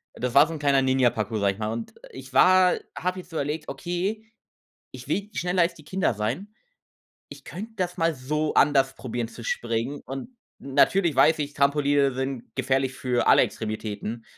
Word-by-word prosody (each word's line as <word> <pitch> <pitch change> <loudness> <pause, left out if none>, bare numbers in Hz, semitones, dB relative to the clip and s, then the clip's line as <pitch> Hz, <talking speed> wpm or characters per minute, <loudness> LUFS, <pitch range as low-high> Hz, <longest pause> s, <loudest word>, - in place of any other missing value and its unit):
das 125 0 -3
war 145 +3 +7
so 165 - -6
'n 155 - -6
kleiner 140 -2 +3
Ninja 130 -2 +3
Parcour, 110 0 -3
sage 100 -1 +2
ich 100 - -15
mal. 110 0 -2
Und, 115 0 -5 0.2
ich 130 0 -11
war 185 0 +6 0.2
habe 185 +1 -2
jetzt 175 - -12
überlegt: 150 0 -3
„Okay, 190 +5 -3 0.7
ich - - -10
will 205 +1 -2
schneller 180 0 +1
als 170 0 +1
die 155 - -16
Kinder 185 -6 0
sein. 135 - -4 0.7
Ich - - -12
könnte 215 +5 -8
das 180 -2 -2
mal 165 -1 +1
so 150 +4 -2
anders 135 -2 +3
probieren, 120 -2 -4
zu 115 0 -11
springen,“ 120 +5 -2
und 135 - -7 0.3
natürlich 155 +5 +2
weiß 150 +4 +5
ich, 145 -1 -4
Trampoline 140 -1 +2
sind 130 -1 -5
gefährlich 130 0 0
für 125 -2 -1
alle - - +6
Extremitäten. 110 +1 -4
140 Hz, 180 wpm, -25 LUFS, 125-170 Hz, 0.7 s, war